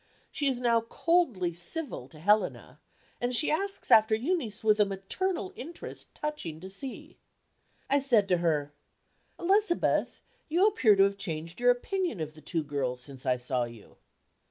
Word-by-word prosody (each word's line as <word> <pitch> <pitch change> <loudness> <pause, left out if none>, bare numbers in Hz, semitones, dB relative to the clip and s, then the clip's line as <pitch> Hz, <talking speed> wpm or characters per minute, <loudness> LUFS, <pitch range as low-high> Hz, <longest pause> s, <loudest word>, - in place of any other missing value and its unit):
She 290 - -1
is 260 -3 0
now 235 -2 +3
coldly 230 - +1
civil 175 - -4
to 155 - -15
Helena; 210 +6 +1 0.4
and 245 +1 0
she 300 - +2
asks 390 +5 -2
after 220 0 +7
Eunice 235 - -2
with 215 -1 +4
a - - +7
maternal 345 - -3
interest 335 +6 -9
touching 300 - -4
to 190 +1 -9
see 260 +7 -9 0.7
I 280 - +3
said 235 -7 +3
to 180 - +4
her: 150 -4 0 0.7
"Elizabeth, 390 0 +1 0.3
you 345 +5 +4
appear 260 - +5
to 195 - +6
have 200 0 +1
changed 165 +2 -5
your 245 0 +4
opinion 340 - 0
of 155 -1 -4
the 155 - -15
two 160 +1 -2
girls, 130 -4 -3
since 135 0 -10
I 125 -1 +3
saw 125 0 -1
you." 115 -3 -13
215 Hz, 160 wpm, -29 LUFS, -, 0.7 s, after